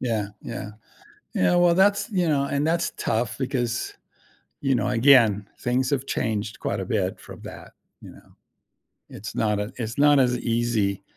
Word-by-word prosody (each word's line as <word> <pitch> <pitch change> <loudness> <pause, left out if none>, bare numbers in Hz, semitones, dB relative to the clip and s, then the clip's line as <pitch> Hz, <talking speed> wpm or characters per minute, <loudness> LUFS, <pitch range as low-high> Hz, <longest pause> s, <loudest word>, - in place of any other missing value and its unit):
Yeah, 110 -5 -1
yeah. 115 -4 -6 0.6
You 200 - 0
know, 175 - +4
well, 175 -1 +5
that's 200 +4 +3
you 180 -5 +1
know, 140 -3 +2
and 140 +1 -1
that's 170 +1 0
tough 115 0 -1
because, 120 -3 -2 0.7
you 135 -1 +1
know, 125 - 0
again, 115 -5 +4
things 125 +1 0
have 135 -2 -1
changed 110 -3 -2
quite 100 - -2
a - - -3
bit 95 -1 -2
from - - -12
that, - - -10 0.3
you - - -11
know? - - -19 0.7
It's 105 +1 -8
not 105 -2 0
a 105 +4 -4
it's 115 -2 -5
not 145 0 +5
as 125 -2 +2
easy, 115 -5 0
120 Hz, 170 wpm, -24 LUFS, 110-140 Hz, 0.7 s, well